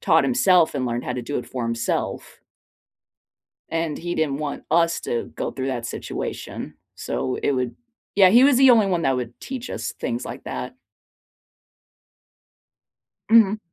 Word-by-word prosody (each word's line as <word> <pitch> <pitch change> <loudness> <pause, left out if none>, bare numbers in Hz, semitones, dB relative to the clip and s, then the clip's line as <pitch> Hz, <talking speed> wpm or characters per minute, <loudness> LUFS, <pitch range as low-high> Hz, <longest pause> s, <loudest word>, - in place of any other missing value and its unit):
taught - - +4
himself 185 - +4
and 130 - -1
learned 120 0 -2
how - - -2
to 125 - -4
do 145 +5 -3
it 125 - -7
for 125 -2 -5
himself. 115 0 -3 1.3
And 165 -2 -2
he 175 +1 -4
didn't 145 -3 0
want 150 -2 -4
us 165 +1 +3
to 120 - -3
go - - -3
through 135 0 -4
that 120 -3 -3
situation, - - -6 0.2
so 130 - -3
it - - +2
would 125 -2 -2 0.4
Yeah, 195 -2 +7
he 240 +7 +6
was 280 -2 +5
the 265 -1 +7
only 225 -4 +5
one 175 -3 0
that 135 -3 +2
would 120 -1 -5
teach 260 -2 -6
us - - -4
things - - -2
like - - -8
that. - - -5 2.6
Mhm. 220 -2 +6
160 Hz, 160 wpm, -23 LUFS, 125-195 Hz, 2.6 s, Yeah